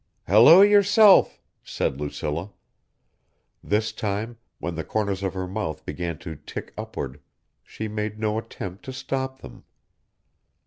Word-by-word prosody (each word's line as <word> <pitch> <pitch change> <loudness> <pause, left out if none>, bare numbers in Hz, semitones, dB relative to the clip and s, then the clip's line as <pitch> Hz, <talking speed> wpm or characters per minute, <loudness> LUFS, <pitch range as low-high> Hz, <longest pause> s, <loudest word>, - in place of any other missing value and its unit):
"Hello 120 - +8
yourself," 205 0 +6 0.2
said 70 +1 -3
Lucilla. 75 +5 -4 1.1
This 105 +1 0
time 110 +3 -4 0.2
when 85 - -4
the 80 0 -4
corners 100 +2 -2
of 95 -1 -3
her 95 -1 -3
mouth 90 -6 -4
began 85 +1 -4
to 80 -2 -5
tick 75 - -8
upward, 70 +2 -6 0.4
she 110 - -6
made 105 0 -4
no 110 0 0
attempt 95 -3 -8
to 130 - -6
stop 130 0 -4
them. - - -12
105 Hz, 130 wpm, -24 LUFS, 85-115 Hz, 1.1 s, Hello